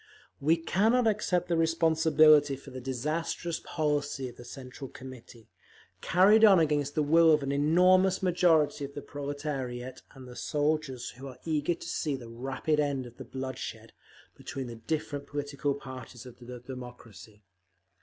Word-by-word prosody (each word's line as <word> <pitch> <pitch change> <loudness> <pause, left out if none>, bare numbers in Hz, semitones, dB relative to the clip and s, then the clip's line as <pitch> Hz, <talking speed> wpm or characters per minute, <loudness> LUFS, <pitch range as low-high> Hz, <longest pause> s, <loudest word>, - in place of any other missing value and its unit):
We 160 +4 +3
cannot 220 +9 +2
accept 195 -5 +1
the 175 - +1
responsibility 160 -3 +4
for 135 +1 -13
the 130 0 -7
disastrous 155 +6 -3
policy 145 -3 -2
of 120 - -14
the - - -10
Central 130 +1 -9
Committee, 125 -3 -12 0.5
carried 205 +5 +5
on 200 -3 +8
against 150 -3 +1
the 155 - +2
will 165 +2 +5
of 150 -2 +3
an 135 - -2
enormous 180 +6 +3
majority 170 -5 +3
of 140 0 -7
the 145 - -6
proletariat 140 -3 -5
and 130 -1 -11
the 125 - -11
soldiers, 150 -4 -1
who 130 +3 -10
are 130 - -10
eager 155 +1 0
to - - -10
see 150 -4 -2
the 120 -3 -9
rapid 135 +6 -2
end 140 -3 0
of 120 0 -13
the - - -8
bloodshed 130 -1 -6 0.4
between 135 -1 -6
the 120 -1 -7
different 145 +3 -4
political 145 -1 -2
parties 130 -3 -10
of 125 -2 -13
the 125 0 -9
democracy…. 120 -4 -11
145 Hz, 155 wpm, -29 LUFS, 130-160 Hz, 0.5 s, on